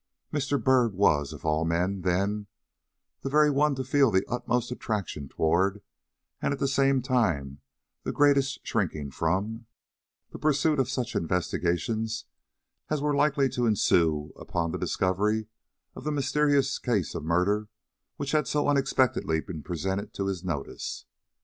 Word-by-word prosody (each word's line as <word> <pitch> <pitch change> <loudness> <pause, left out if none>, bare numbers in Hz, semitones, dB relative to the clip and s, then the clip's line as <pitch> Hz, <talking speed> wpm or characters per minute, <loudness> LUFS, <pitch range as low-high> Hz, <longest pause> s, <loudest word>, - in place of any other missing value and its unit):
Mr. 145 -1 0
Byrd 125 -6 +3
was, 75 -7 +3
of - - -10
all 80 0 +1
men, 90 +4 0
then, 100 +4 0 0.7
the 135 - -3
very 150 +1 +4
one 145 +1 +2
to 130 - -3
feel 135 0 +3
the 95 -2 +2
utmost 125 +1 -1
attraction 100 - -3
toward, 95 +5 +1 0.6
and - - 0
at 140 - -2
the 140 - +1
same 135 -1 +2
time 85 - 0 0.4
the - - -3
greatest 140 -2 +2
shrinking 80 -10 -2
from, 100 - -1 0.6
the - - -8
pursuit 150 0 +2
of 130 -1 +1
such 125 -2 -3
investigations 95 +6 -1 0.6
as 155 - 0
were 145 0 0
likely 140 -1 +3
to 120 -2 0
ensue 80 -8 +2
upon 85 -5 -2
the - - -4
discovery 105 +4 0 0.5
of - - -10
the 150 - -1
mysterious 145 -1 +2
case 105 - 0
of - - -5
murder 90 +6 +1 0.5
which 140 -1 -3
had 150 -3 +2
so 150 +2 +1
unexpectedly 135 - +2
been 80 -2 -7
presented 95 +5 -3
to 100 - -2
his 95 -2 -3
notice. 80 -7 -4
110 Hz, 150 wpm, -27 LUFS, 90-135 Hz, 0.7 s, very